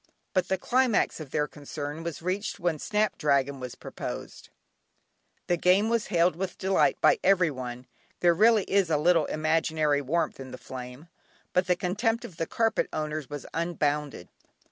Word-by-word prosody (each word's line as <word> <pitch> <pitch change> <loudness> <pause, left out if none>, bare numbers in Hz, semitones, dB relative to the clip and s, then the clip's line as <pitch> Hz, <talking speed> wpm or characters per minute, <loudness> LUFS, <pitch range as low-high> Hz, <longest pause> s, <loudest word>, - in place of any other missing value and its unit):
But 185 - +1
the 190 - 0
climax 250 -6 +1
of 155 -3 -8
their 150 +2 0
concern 145 +1 -6
was 165 -1 -6
reached 195 +4 -2
when 170 -4 0
"Snap 210 +4 0
dragon" 140 -2 +1
was 125 -2 -6
proposed. - - -7 1.0
The 175 - +1
game 185 +5 +3
was 230 -2 0
hailed 170 -1 +2
with 190 +2 -4
delight 190 0 +2
by 470 - +5
every 180 -5 +4
one 125 -2 -6 0.3
(there 175 -1 +4
really 215 +3 +5
is 195 -3 +1
a 155 - +3
little 165 0 +3
imaginary 155 -2 +1
warmth 160 +4 -1
in 130 -1 -8
the 130 - -8
flame), 125 +4 -9 0.5
but 180 0 +2
the 180 - +3
contempt 220 +6 -1
of 170 - -11
the 165 - -2
carpet 225 -1 0
owners 155 -2 -3
was 145 -3 -6
unbounded. 150 - -1
165 Hz, 165 wpm, -27 LUFS, 145-190 Hz, 1.0 s, by